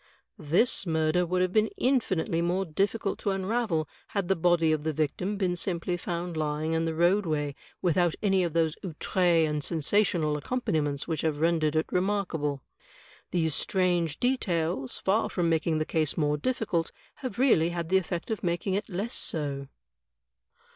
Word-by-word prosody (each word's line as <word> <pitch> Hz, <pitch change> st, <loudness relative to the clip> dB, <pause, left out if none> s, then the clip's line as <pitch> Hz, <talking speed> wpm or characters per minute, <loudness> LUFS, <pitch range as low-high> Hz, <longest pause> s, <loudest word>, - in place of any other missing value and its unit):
This 175 Hz, -, +2 dB
murder 160 Hz, +2 st, +1 dB
would 180 Hz, +1 st, +1 dB
have 185 Hz, 0 st, -1 dB
been 215 Hz, 0 st, +3 dB
infinitely 190 Hz, -10 st, +1 dB
more 180 Hz, +3 st, 0 dB
difficult 195 Hz, +5 st, -1 dB
to -, -, -1 dB
unravel 195 Hz, -4 st, 0 dB, 0.2 s
had 195 Hz, -3 st, -2 dB
the 195 Hz, -, +4 dB
body 165 Hz, -1 st, +3 dB
of 155 Hz, -1 st, 0 dB
the 160 Hz, 0 st, -1 dB
victim 180 Hz, +7 st, -1 dB
been 185 Hz, -3 st, 0 dB
simply 175 Hz, 0 st, -1 dB
found 175 Hz, 0 st, -4 dB
lying 155 Hz, +1 st, -1 dB
in 165 Hz, 0 st, +1 dB
the 165 Hz, -1 st, -2 dB
roadway 165 Hz, -4 st, +1 dB, 0.3 s
without 175 Hz, -1 st, +2 dB
any 195 Hz, -2 st, +3 dB
of 170 Hz, -3 st, -2 dB
those 160 Hz, -2 st, +1 dB
otUre 170 Hz, -1 st, +2 dB
and 150 Hz, -1 st, -2 dB
sensational 165 Hz, -1 st, +1 dB
accompaniments 150 Hz, -, -1 dB
which 160 Hz, -2 st, -1 dB
have 155 Hz, -2 st, -1 dB
rendered 160 Hz, -2 st, +2 dB
it 155 Hz, -, +2 dB
remarka 190 Hz, -2 st, 0 dB
ble. 145 Hz, -2 st, -2 dB, 0.7 s
These 160 Hz, -3 st, 0 dB
strange 175 Hz, -3 st, 0 dB
details, 170 Hz, -, 0 dB
far 205 Hz, +4 st, +1 dB
from 175 Hz, -2 st, 0 dB
making 160 Hz, 0 st, +1 dB
the 155 Hz, -, 0 dB
case 155 Hz, -3 st, 0 dB
more 150 Hz, -2 st, +2 dB
difficult, 175 Hz, -, -1 dB, 0.3 s
have 255 Hz, -6 st, -6 dB
really 230 Hz, -11 st, +4 dB
had 170 Hz, -1 st, -4 dB
the 190 Hz, -, +5 dB
effect 175 Hz, +2 st, -5 dB
of 220 Hz, -, -2 dB
making 175 Hz, +2 st, -1 dB
it 200 Hz, +3 st, -2 dB
less 205 Hz, +6 st, -3 dB
so." 140 Hz, -3 st, -2 dB
170 Hz, 165 wpm, -28 LUFS, 155-190 Hz, 0.7 s, the